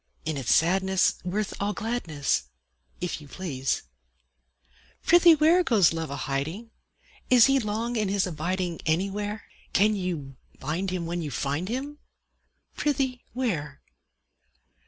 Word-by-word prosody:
In 155 -1 -1
its 135 -4 -1
sadness 190 +3 +3
worth 195 +3 -2
all 205 +1 0
gladness, 155 - -1 0.5
If 180 -3 -3
you 145 - -12
please! 140 -6 -2 1.2
Prithee 345 -1 +7
where, 325 +4 +4
Goes 210 - +4
Love 165 -1 -3
a 140 - -4
hiding? 155 - -3 0.6
Is 245 -2 +8
he 270 0 +4
long 225 +2 -2
in 215 -3 +1
his 200 -1 +1
abiding 175 +1 -2
Anywhere? 200 +5 -1 0.3
Can 210 +3 +4
you 165 -9 -4 0.2
bind 180 +6 -2
him 180 -2 -3
when 170 +1 -3
you 155 - -4
find 145 +7 -2
him; 280 +5 -4 0.8
Prithee, 265 -4 -1
where? 165 - -3
190 Hz, 130 wpm, -26 LUFS, 160-230 Hz, 1.2 s, Is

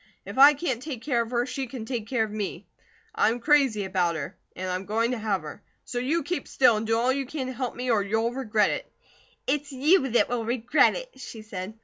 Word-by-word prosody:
If - - -5
I 285 +2 +9
can't 265 -6 -2
take 260 -6 -6
care 250 -5 +1
of 230 - -4
her, 240 0 0
she 265 0 -4
can 235 -2 -7
take 230 -3 -4
care 235 -2 +1
of 215 - -4
me. 210 -2 -4 0.5
I - - +3
am 235 +2 -2
crazy 270 -6 +3
about 180 -3 0
her, 160 +5 -5 0.2
an' 185 - -4
I'm 185 +1 -3
going 225 +3 +1
to 250 - -2
have 205 -5 -1
her; 155 +6 -9 0.2
so 245 - -3
you 290 +7 0
keep 320 -1 -3
still, 255 -4 +4
an' 215 +1 -2
do 225 +1 +1
all 245 +3 +2
you 275 -1 -3
can 280 -1 -4
to 260 - -5
help 250 -1 -4
me, 250 0 -1
or 215 -3 +3
you'll 220 +4 0
regret 220 -5 +1
it." - - -5 0.5
"It's 290 +2 -1
you 275 +2 +3
that 240 - +3
will 240 -1 -2
regret 245 +5 +3
it!" - - -8
she 225 -4 -9
said. 200 -1 -6
240 Hz, 245 wpm, -26 LUFS, 215-270 Hz, 0.5 s, I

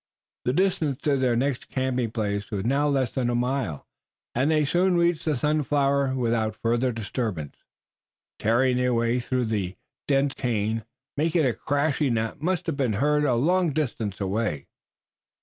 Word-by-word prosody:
The 125 - +1
distance 160 -6 +1
to 145 -2 +2
their 130 -3 +2
next 130 +1 -1
camping 130 -3 -1
place 105 -2 -2
was 100 -1 -3
now 140 +4 +2
less 135 -4 +1
than 125 -3 -1
a 120 - 0
mile, 125 - -1 0.5
and 130 +5 +1
they 155 -2 +3
soon 180 +4 +2
reached 170 -2 +1
the 155 -2 +1
Sunflower 140 -1 +1
without 115 -3 0
further 120 +3 +1
disturbance, 110 - -4 0.8
tearing 125 +3 +2
their 125 -1 +2
way 115 +1 +1
through 125 0 -1
the 100 -4 -2 0.3
dense 140 0 +2
cane, 110 -2 -1 0.3
making 160 +1 +2
a 125 - +2
crashing 145 -1 0
that 115 +6 -2
must 180 +1 0
have 160 -4 -2
been 130 -6 +1
heard 150 +7 +2
a 125 -4 +2
long 170 +5 +2
distance 115 -9 -2
away. 100 -7 -1
130 Hz, 160 wpm, -25 LUFS, 115-145 Hz, 0.8 s, they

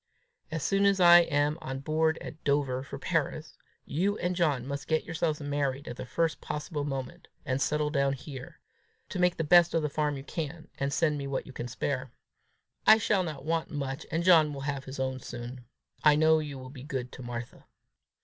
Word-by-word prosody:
As 160 -2 -3
soon 195 0 +3
as 195 -1 +3
I 175 -1 +9
am 150 -2 +1
on 135 0 -5
board 160 +2 +1
at 155 - -9
Dover 140 -3 +1
for 135 - -7
Paris, - - -2 0.3
you 195 +8 0
and 180 +1 -1
John 150 -8 +1
must 140 0 -5
get 160 -1 +1
yourselves 155 -2 -1
married 145 -1 -2
the 125 - -7
first 165 +5 0
possible 150 0 -4
moment, 135 -3 -5 0.2
and 130 +1 -1
settle 150 +2 +1
down 140 -2 +2
here 135 -1 -9 0.5
to 185 - -4
make 180 0 +3
the 165 - 0
best 175 +2 +6
of 165 - +2
the 150 - 0
farm 150 -1 0
you 135 - -7
can, 160 +1 -5
and 140 0 0
send 150 -1 +1
me 140 - -4
what 135 -1 -2
you 135 - -11
can 120 - -5
spare. 130 0 -3 0.8
I 220 - +9
shall 210 -2 +2
not 150 -6 -5
want 165 0 0
much, 140 0 -4
and 165 +1 -1
John 160 -5 +5
will 135 - -6
have 140 -1 -3
his 130 0 -7
own 130 0 -1
soon. 120 +1 -8 0.4
I 150 -1 +7
know 160 +1 +5
you 145 -3 -5
will 130 0 -9
be 135 -3 -10
good 130 -3 -4
to - - -10
Martha!" 120 -1 -7
145 Hz, 205 wpm, -29 LUFS, 135-160 Hz, 0.8 s, I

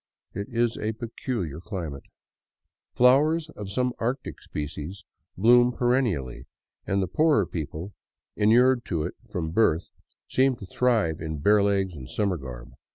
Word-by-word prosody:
It 100 +1 -4
is 120 0 0
a 110 +1 -1
peculiar 110 - -4
climate. 85 -7 -6 0.9
Flowers 150 +6 +4
— - - -15
of 105 -2 -7
some 125 +4 0
Arctic 125 +4 -3
species 75 +5 -6 0.2
— - - -48
bloom 120 +5 +6
perennially, 120 - 0 0.4
and 95 0 +1
the - - -2
poorer 150 - +3
people, 80 +4 -6 0.4
inured 120 +4 +4
to 80 -4 -1
it - - -4 0.2
from 80 -3 -3
birth, 85 -4 +2 0.4
seem 130 0 +2
to 105 - -10
thrive 110 -7 +1
in 80 -1 -4
bare 105 +8 +4
legs 100 -2 +1
and 65 -5 -9
summer 100 -4 0
garb. 65 -2 -9
100 Hz, 150 wpm, -26 LUFS, 80-125 Hz, 0.9 s, bloom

